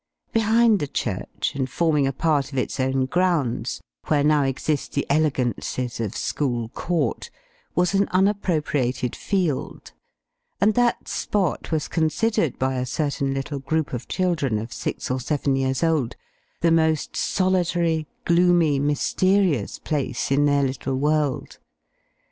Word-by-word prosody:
Behind 225 -1 +4
the 145 - -2
church, 105 -7 -3
and 130 -1 -2
forming 150 -2 +2
a - - +1
part 145 -1 0
of 135 - -6
its 130 - -2
own 130 0 +1
grounds, 140 -8 0 0.3
(where 145 -2 +2
now 150 0 +4
exist 140 +2 -1
the 140 - 0
elegances 130 -4 0
of 110 -4 -3
School 120 -6 -1
Court,) 170 +6 -2 0.5
was 180 +1 +2
an 200 +1 +3
unappropriated 155 - 0
field; 180 -9 -2 0.7
and 210 +3 +4
that 245 +1 +1
spot 195 -6 -1
was 155 -2 0
considered, 165 - 0
by 130 0 0
a 125 - -1
certain 140 0 -1
little 140 +1 -3
group 155 +2 -1
of 125 0 -4
children, 165 - 0
of 115 +3 -5
six - - -4
or 130 - 0
seven 140 +1 0
years 135 +2 0
old, 155 -7 +1 0.5
the 165 - +3
most 160 -2 +1
solitary, 175 -4 +1 0.2
gloomy, 170 -4 +4
mysterious 150 - +1
place 145 -3 -2
in 145 +1 +4
their 145 -1 +3
little 135 0 -2
world. 150 0 0
150 Hz, 135 wpm, -23 LUFS, 135-175 Hz, 0.7 s, Behind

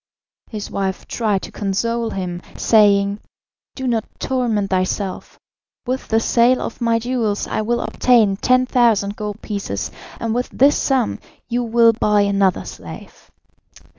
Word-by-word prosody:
His 210 -3 -6
wife 190 -1 -3
tried 210 -5 -1
to - - -8
console 230 +4 -1
him, 180 -4 -4 0.2
saying: 200 -2 +3 0.6
"Do 265 - -5
not 230 -3 +1
torment 230 -7 -1
thyself. 185 +1 -2 0.5
With 255 +1 -3
the 225 - +2
sale 240 +2 +3
of 235 - -6
my 230 -1 +2
jewels 230 -3 -1
I - - -2
will 235 +2 0
obtain 225 -6 +3
10,000 240 -5 +2
gold 210 0 -6
pieces, 200 - -4 0.3
and 230 -1 -2
with 245 +1 -1
this 280 +3 +4
sum 265 -4 0 0.3
you 240 +1 0
will 230 -1 +4
buy 210 -1 +2
another 200 -2 +1
slave." - - -11
220 Hz, 135 wpm, -20 LUFS, 200-240 Hz, 0.6 s, this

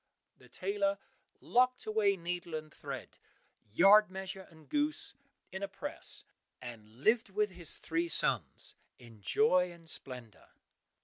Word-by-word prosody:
The - - -18
tailor 300 -8 -1 0.4
locked 255 +1 +2
away 215 -2 +2
needle 175 -1 -4
and 155 -1 -7
thread, - - -8 0.5
yard 200 - +7
measure 190 0 -6
and 160 -2 -18
goose, 295 0 +3 0.4
in 190 +1 -6
a 200 - -2
press, - - -4 0.3
and 115 -4 -10
lived 230 +1 +3
with 210 +1 0
his 175 -4 -1
three 165 +1 -1
sons - - +1 0.2
in 115 -3 -15
joy 180 - +3
and 170 -1 -15
splendour. 125 -8 -2
185 Hz, 130 wpm, -33 LUFS, 160-215 Hz, 0.5 s, yard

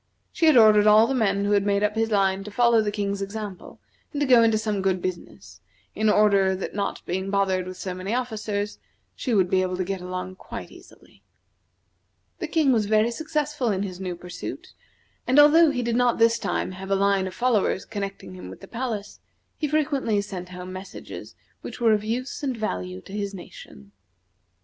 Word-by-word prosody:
She 330 - +2
had 310 - +6
ordered 215 -2 +6
all 215 +1 +7
the 270 - -1
men 200 -5 +1
who 205 - 0
had 200 -1 +3
made 200 0 +1
up 210 0 +1
his 225 +1 0
line 195 -2 +1
to - - -6
follow 235 +1 +3
the 210 -1 -1
King's 200 -1 -2
example 200 -1 -7 0.3
and 290 - -4
to 290 - +2
go 250 -3 +6
into 225 -1 +4
some 215 -2 -2
good 190 -1 +1
business; 180 -1 -7 0.3
in 215 0 +1
order 200 -2 +4
that 185 - -5
not 200 0 -3
being 190 +2 -3
bothered 190 -2 0
with 185 0 -7
so 185 0 -4
many 185 +2 -5
officers, 215 -4 -3 0.4
she 245 -4 -1
would 190 -3 +3
be 185 +1 +2
able 185 -1 -2
to 185 - 0
get 190 0 -4
along 185 +1 -6
quite - - -8
easily. - - -18 1.2
The - - -3
King 310 -5 +2
was 220 -4 +2
very 215 +2 +3
successful 300 -2 -2
in 195 -1 0
his 185 -2 -6
new 185 -2 -4
pursuit, 175 +1 -8 0.5
and 260 - +2
although 305 +3 +7
he 250 -4 -2
did 235 0 -1
not 245 -1 +2
this 230 0 +4
time - - -2
have 190 +1 -8
a 195 - +3
line 195 -1 +2
of 185 - -8
followers 230 -5 +1
connecting 195 - -6
him 90 0 -9
with 95 - -11
the - - -11
palace, 230 -4 -5 0.4
he 305 - -2
frequently 280 -7 0
sent 185 -3 -7
home 180 0 -8
messages 185 0 -9 0.3
which - - -8
were 230 -2 +4
of 210 -1 0
use 240 +4 -3
and 265 -4 -2
value 90 - -4
to 190 - -13
his 200 -1 -3
nation. 100 - -12
205 Hz, 200 wpm, -24 LUFS, 190-230 Hz, 1.2 s, all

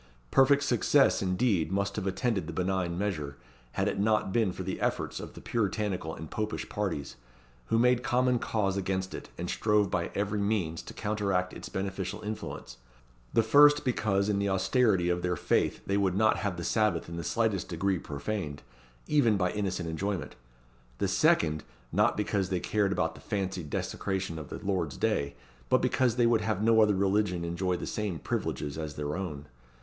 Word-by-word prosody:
Perfect 140 +1 +5
success, 140 0 +3
indeed, 95 -3 +1
must 100 +1 0
have 95 - -2
attended 95 -3 -1
the 85 - -5
benign 90 -1 -1
measure, 80 -8 -2 0.4
had - - 0
it - - -1
not 105 -2 +2
been 110 -5 +2
for 95 - -6
the 95 +1 -4
efforts - - -1
of - - -8
the - - -10
Puritanical 105 -7 -1
and 80 0 -9
Popish 110 0 -3
parties, 95 -9 -3 0.5
who 115 - +1
made 125 +1 +4
common 125 0 +2
cause 100 -4 0
against 95 0 -2
it, - - -7
and 90 - -4
strove 105 0 +2
by - - 0
every 105 +1 -1
means 100 -6 0
to - - -11
counteract 100 -3 -1
its - - -8
beneficial 95 +1 -3
influence: 105 - -6 0.6
the 115 - +5
first 145 +5 +6
because 100 -5 +1
in 105 -1 +1
the 100 0 0
austerity 95 0 +2
of 90 0 +1
their 90 0 0
faith - - +1
they 100 - +1
would 95 -2 +1
not 110 +2 +3
have 100 -4 -2
the 85 - -4
Sabbath 105 -3 +1
in 85 - -7
the 85 - -4
slightest 110 +1 0
degree 95 +2 0
profaned, 75 0 -4 0.4
even 120 -8 +3
by 90 -2 +1
innocent 95 -4 -2
enjoyment; 95 +3 -3 0.6
the - - 0
second, 75 -1 +2 0.3
not - - +2
because 100 -3 0
they 90 -2 0
cared 100 +1 +1
about 80 -4 0
the - - -14
fancied 95 -6 -3
desecration 95 0 -2
of 75 - -9
the - - -5
Lord's 85 -9 -1
day, 70 +2 0 0.3
but - - +5
because 125 -3 +2
they 120 -1 +3
would 115 -2 +3
have 105 -1 -1
no 110 0 +5
other 105 -2 +4
religion 95 -2 +1
enjoy 90 +2 -1
the - - -5
same 105 -5 -2
privileges 75 +1 -3
as 75 -2 -5
their 75 +1 -3
own. 75 -7 -5
95 Hz, 185 wpm, -29 LUFS, 90-105 Hz, 0.6 s, first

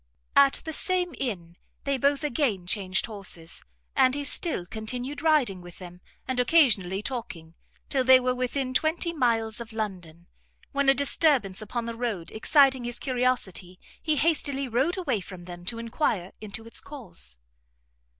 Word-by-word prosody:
At 280 -1 +5
the 320 - -4
same 360 0 +1
Inn 175 -9 -4 0.3
they 275 -1 0
both 280 +3 +2
again 245 - 0
changed 185 0 0
horses, 195 -6 -4 0.3
and 260 -1 +4
he 290 - -2
still 285 - 0
continued 245 +8 -5
riding 290 - +2
with 175 0 -12
them, 180 -1 -11 0.3
and 260 -1 -1
occasionally 220 - +4
talking, 185 -10 -6 0.3
till 265 -2 +1
they 260 0 +8
were 255 0 0
within 255 +1 -2
twenty 320 +5 +1
miles 230 -6 0
of 230 -1 -8
London, 180 -6 -5 0.5
when 280 -1 +2
a 270 - +6
disturbance 275 - +3
upon 230 +2 -4
the 230 - -4
road 230 -8 -3
exciting 265 +2 +4
his 240 0 -3
curiosity, 245 -9 -1 0.2
he 310 -2 +1
hastily 285 -3 +1
rode 265 - 0
away 265 - -1
from 180 -1 -10
them 175 0 -9
to 230 - -3
enquire 230 - -1
into 215 +1 -6
its 230 - -3
cause. 65 - -3
245 Hz, 155 wpm, -27 LUFS, 195-280 Hz, 0.5 s, they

